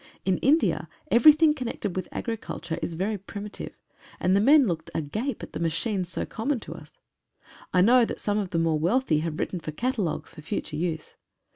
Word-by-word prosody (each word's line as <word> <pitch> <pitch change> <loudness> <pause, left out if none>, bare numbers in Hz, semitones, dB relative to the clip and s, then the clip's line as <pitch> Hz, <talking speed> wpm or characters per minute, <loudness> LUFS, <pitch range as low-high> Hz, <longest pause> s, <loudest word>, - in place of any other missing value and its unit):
In 185 -1 +1
India 300 +5 +2 0.2
1 - - +2
everything 305 +4 +7
connected 235 - -4
with 185 - -3
agriculture 210 -7 -4
is 165 - -3
very 200 +4 -1
primitive, 205 +2 -8 0.4
and 185 +1 +2
the 200 - +4
men 285 +4 +6
looked 165 -5 -3
agape 215 - -3
at - - -9
the - - -4
machines 175 +3 -1
so - - -3
common 245 +4 -2
to - - -7
us. - - -13 0.8
I 180 - +4
know 240 +5 +6
that - - -5
some 205 0 0
of 195 -3 -3
the 165 - -2
more 165 -2 +2
wealthy 175 -1 +2
have 155 -1 -3
written 180 - -2
for 160 - -7
catalogues 210 - -2
for - - -11
future 150 0 -4
use. 160 -1 -3
195 Hz, 190 wpm, -26 LUFS, 165-240 Hz, 0.8 s, everything